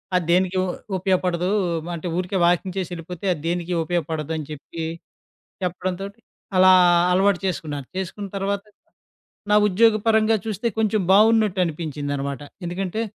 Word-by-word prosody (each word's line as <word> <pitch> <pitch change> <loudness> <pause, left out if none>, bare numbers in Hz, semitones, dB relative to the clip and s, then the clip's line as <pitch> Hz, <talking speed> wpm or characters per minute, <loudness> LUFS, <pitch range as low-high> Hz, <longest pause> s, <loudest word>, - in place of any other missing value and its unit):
అది 180 - +1
దేనికి 185 +1 +2
ఉ - - -1 0.3
ఉపయోగపడదు. 180 -1 0 0.5
అంటే 170 +2 -5
ఊరికే 185 +1 -1
వాకింగ్ 180 +2 +1
చేసెళ్ళిపోతే 175 0 -6
అది 155 - -9
దేనికి 175 +1 -2
ఉపయోగపడదని 160 -2 -2
చెప్పి 155 +2 -7 0.8
చెప్పడంతోటి 185 +4 -4 0.4
అలా 185 0 +7 0.4
అలవాటు 190 +1 +3
చేసుకున్నాను. 150 -6 -3
చేసుకున్న 190 +2 -4
తర్వాత 200 +1 -2 0.9
నా - - +5
ఉద్యోగపరంగా 220 +2 +3
చూస్తే 220 +2 -3
కొంచెం 215 -1 +2
బావున్నట్టనిపించిందనమాట. 165 -10 +1 0.2
ఎందుకంటే 185 +4 -3
180 Hz, 110 wpm, -23 LUFS, 165-200 Hz, 0.9 s, అలా